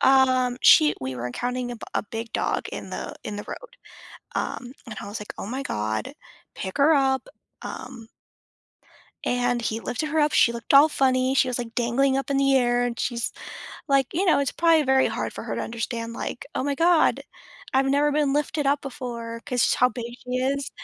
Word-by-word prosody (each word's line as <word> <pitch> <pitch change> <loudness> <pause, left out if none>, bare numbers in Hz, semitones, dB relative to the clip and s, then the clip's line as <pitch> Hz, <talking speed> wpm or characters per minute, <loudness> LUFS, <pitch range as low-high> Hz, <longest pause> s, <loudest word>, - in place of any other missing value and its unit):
um, 255 -2 +4
she 305 -1 +7
we 130 0 -4
were 120 +1 -4
encountering 245 - -3
a - - -7
b - - -17
a - - +1
big 225 +2 -7
dog - - -1
in - - -7
the - - -5
in 205 - -5
the 205 - -6
road, - - -9 0.6
um, 245 0 -3
and 220 -3 -8
I - - -7
was, 205 +2 -5
like, 210 - -8
"Oh - - -5
my 260 +5 -4
god, 110 - -3 0.4
pick 190 - -5
her 290 +3 +5
up," 270 - +2 0.3
um 235 -3 -8 1.2
and 245 -1 +1
he 225 0 -2
lifted 275 +7 -3
her 315 0 +2
up, 295 0 +2
she 235 - +5
looked 235 +3 -4
all 285 +3 +8
funny, 260 -2 +2
she 260 - +3
was, 245 - -2
like, 235 -1 -6
dangling 265 +3 +2
up 275 +1 -3
in 275 - +2
the 275 0 +3
air, 245 -1 +2
and 240 -1 -3
she's, 235 -2 -2 0.6
like 275 -2 +3
you 370 +5 +1
know, 320 - +5
it's 280 -2 0
probably 330 -2 +4
very 265 0 +3
hard - - -3
for - - -7
her - - -3
to - - -2
understand, 230 0 -4
like, 235 - -5
"Oh - - -1
my 285 0 0
god. 335 +2 +3 0.5
I've 270 +1 +3
never 285 +2 +2
been 295 -2 +2
lifted 295 0 0
up 285 +1 +2
before," 235 -3 -6
'cause 250 -1 +2
how 250 - +4
big 240 -2 -6 0.2
she 250 - -9
is. 275 +2 -1
255 Hz, 205 wpm, -25 LUFS, 235-275 Hz, 1.2 s, all